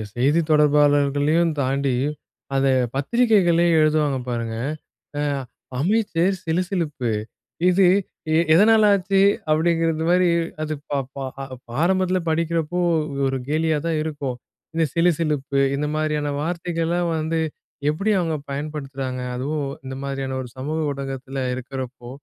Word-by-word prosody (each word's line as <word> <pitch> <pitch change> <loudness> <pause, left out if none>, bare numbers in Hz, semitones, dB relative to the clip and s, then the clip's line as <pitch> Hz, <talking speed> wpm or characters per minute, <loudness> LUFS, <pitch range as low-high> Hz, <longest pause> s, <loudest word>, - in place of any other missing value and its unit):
செய்தி 140 +7 +3
தொடர்பாளர்களையும் 150 +2 +3
தாண்டி 135 0 0 0.6
அத 135 0 +2 0.3
பத்திரிகைகளே 180 - +3
எழுதுவாங்க 155 -3 +2
பாருங்க. 115 -2 -3 0.6
அ - - 0 0.6
"அமைச்சர் 190 +1 +1
சிலுசிலுப்பு, 165 - -1 0.6
இது 185 +1 +4 0.5
எ - - +4 0.2
எதனால 220 +4 +6
ஆச்சு" 195 +1 +1 0.3
அப்டிங்கிறது 165 0 +1
மாரி 180 0 +4 0.3
அது 155 0 -2 0.2
ப 140 -1 0 0.2
ப - - -10 0.7
ஆரம்பத்தில 185 0 +2
படிக்கிறப்போ 165 +1 0 0.5
ஒரு 135 0 -1
கேலியா 155 0 +1
தான் 160 -2 0
இருக்கும். 145 -5 -3 0.4
இந்த 165 0 +1
சிலுசிலுப்பு 150 -5 +1 0.2
இந்த 150 +2 -1
மாரியான 150 -1 0
வார்த்தைகள்லாம் 170 +1 -1
வந்து 160 +1 -1 0.5
எப்டி 195 +8 0
அவங்க 165 -3 0
பயன்படுத்துறாங்க? 140 -3 -4
அதுவும் 140 +2 -2 0.2
இந்த 130 0 -5
மாதிரியான 135 -1 -3
ஒரு 125 - -8
சமூக 150 +5 -3
ஊடகத்தில 135 0 -5 0.2
இருக்கறப்போ, 130 -1 -7
155 Hz, 110 wpm, -22 LUFS, 140-170 Hz, 0.7 s, எதனால